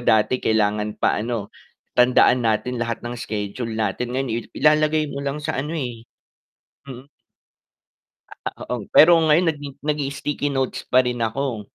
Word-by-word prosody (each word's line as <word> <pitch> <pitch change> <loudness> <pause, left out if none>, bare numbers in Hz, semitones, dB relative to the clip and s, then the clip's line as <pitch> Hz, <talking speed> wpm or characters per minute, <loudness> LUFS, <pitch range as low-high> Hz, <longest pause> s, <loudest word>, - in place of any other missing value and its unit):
dati 110 +1 +2
kailangan 105 -1 0
pa - - +1
ano, 115 -2 -4 0.4
tandaan 125 0 +4
natin 115 +2 -1
lahat 115 0 -3
ng 120 0 -5
schedule 105 +3 -4
natin, 115 +4 -2
ngayon 135 -3 -1
i 115 - -1 0.2
ilalagay 155 0 +3
mo 140 - -5
lang 140 0 -3
sa 155 - -1
ano 155 +4 -4
eh, 120 -5 -5 0.8
mm 130 +2 -10 1.4
Ah, - - -4 0.2
oo 105 - -8
pero 160 +3 +8
ngayon 160 +3 +4
nag 150 - -8 0.3
nagii-sticky 145 0 -2
notes 135 -1 -1
pa 125 - +5
rin 120 -1 -2
ako. 120 -4 -4
125 Hz, 150 wpm, -22 LUFS, 110-140 Hz, 1.4 s, pero